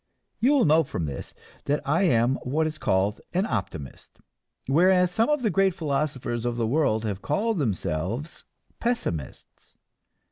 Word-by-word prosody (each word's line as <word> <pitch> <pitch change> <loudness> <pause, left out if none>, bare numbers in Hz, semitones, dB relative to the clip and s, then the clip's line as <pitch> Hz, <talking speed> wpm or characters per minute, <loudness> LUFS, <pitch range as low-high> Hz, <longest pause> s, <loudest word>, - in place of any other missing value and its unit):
You 260 +5 +4
will 265 - +4
note 160 +1 +4
from 85 - -3
this 70 -2 -6 0.3
that 145 +1 +1
I 160 +6 +2
am 125 -7 +3
what 150 +5 0
is 155 0 -4
called 95 +3 +1
an 185 +3 +1
optimist; 95 - -5 0.5
whereas 180 +5 +4
some 225 +7 +1
of 295 -3 +1
the 215 - +2
great 190 0 +2
philosophers 135 -6 -2
of 120 -1 -2
the 115 - 0
world 115 -4 +1
have 100 -2 -3
called 205 +7 0
themselves 110 - -2 0.4
pessimists. 230 - -4
145 Hz, 150 wpm, -26 LUFS, 110-180 Hz, 0.5 s, You